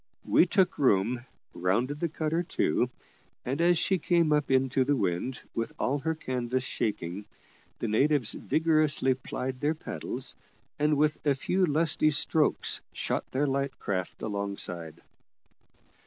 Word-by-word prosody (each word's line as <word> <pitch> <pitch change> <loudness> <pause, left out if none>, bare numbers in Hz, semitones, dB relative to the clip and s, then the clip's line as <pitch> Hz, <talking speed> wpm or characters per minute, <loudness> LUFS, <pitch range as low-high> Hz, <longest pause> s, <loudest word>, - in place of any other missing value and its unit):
We 180 - +5
took 185 0 +2
room, 120 -1 +2 0.3
and - - -11
rounded 125 +11 +1
the 170 - -1
cutter 155 +1 -1
to, 125 -7 0 0.6
and 135 +6 -1
as 175 0 +4
she 190 +2 +1
came 170 -3 +2
up 150 -1 +1
into 130 0 +3
the 145 +2 +2
wind, 120 +4 -2
with 115 - -3
all 140 +3 0
her 160 +3 -1
canvas 130 -3 -2
shaking, 100 -5 -3 0.5
the 115 - -3
natives 135 +2 +3
vigorously 155 -4 +2
plied 130 0 -5
their 150 +3 +1
paddles, 125 -4 -4 0.4
and 150 0 +2
with 150 +1 +1
a 145 -2 +2
few 185 +7 +1
lusty 155 0 +2
strokes 155 +1 +1
shot - - -2
their 140 +3 0
light 140 -1 -1
craft 95 -2 -4
alongside. 100 -6 -4
135 Hz, 140 wpm, -28 LUFS, 120-155 Hz, 0.6 s, We